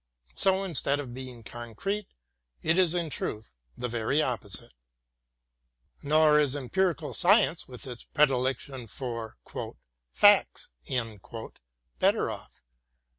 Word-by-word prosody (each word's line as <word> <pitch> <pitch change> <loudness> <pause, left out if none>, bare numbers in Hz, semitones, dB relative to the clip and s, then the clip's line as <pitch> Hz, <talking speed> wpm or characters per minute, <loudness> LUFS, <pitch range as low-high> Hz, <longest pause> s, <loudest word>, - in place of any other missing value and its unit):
So 190 0 +3
instead 145 -5 +1
of 130 -4 -6
being 125 -2 -8
concrete, 120 - -4 0.6
it 160 - +3
is, 180 -2 +3
in 170 -3 -1
truth, 110 - -4 0.2
the 125 - -2
very 120 +4 0
opposite. 115 - -2 1.3
Nor 150 +1 +5
is 145 -2 +2
empirical 155 +1 0
science 175 -2 +4
with 125 +2 -9
its 125 -2 -8
predilection 130 -2 +1
for 115 - -5 0.7
"facts" - - +5 1.3
better - - +3
off. - - -11
135 Hz, 105 wpm, -28 LUFS, 120-160 Hz, 1.3 s, Nor